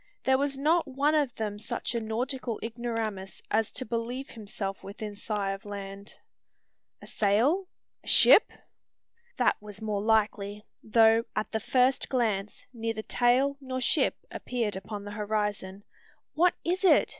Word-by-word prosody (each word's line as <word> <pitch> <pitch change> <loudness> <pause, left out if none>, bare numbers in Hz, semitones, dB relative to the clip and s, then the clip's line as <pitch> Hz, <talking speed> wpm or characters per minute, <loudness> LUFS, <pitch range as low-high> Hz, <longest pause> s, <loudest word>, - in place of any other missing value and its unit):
There 265 0 +3
was 280 -1 -1
not 315 +3 +2
one 280 +3 +1
of 290 -6 +1
them 210 -2 -4
such 235 +3 -4
a 235 - 0
nautical 235 +1 -3
ignoramus 225 -5 -4
as 220 0 +1
to 255 - -2
believe 235 +4 -3
himself 200 -3 -6
within 205 +1 -7
sigh 205 -1 -2
of 195 0 -6
land. 200 0 -8 0.9
"A - - -9
sail? 245 - +2 0.4
a - - -18
ship?" - - +7 0.9
That - - +2
was 205 -1 -9
more 210 -2 -2
likely: 210 -1 0 0.2
though, 225 +1 +4
at 215 - -2
the 220 - -1
first 255 +4 +2
glance, 215 -6 -1
neither 225 -2 -3
tail 255 +5 +2
nor 260 -1 -4
ship 255 - +2 0.2
appeared 230 -5 -2
upon 200 +2 -6
the 205 - -7
horizon, 205 -2 -3 0.5
"What 350 +3 +3
is 360 +3 -1
it?" 380 - +5
220 Hz, 145 wpm, -28 LUFS, 205-255 Hz, 0.9 s, ship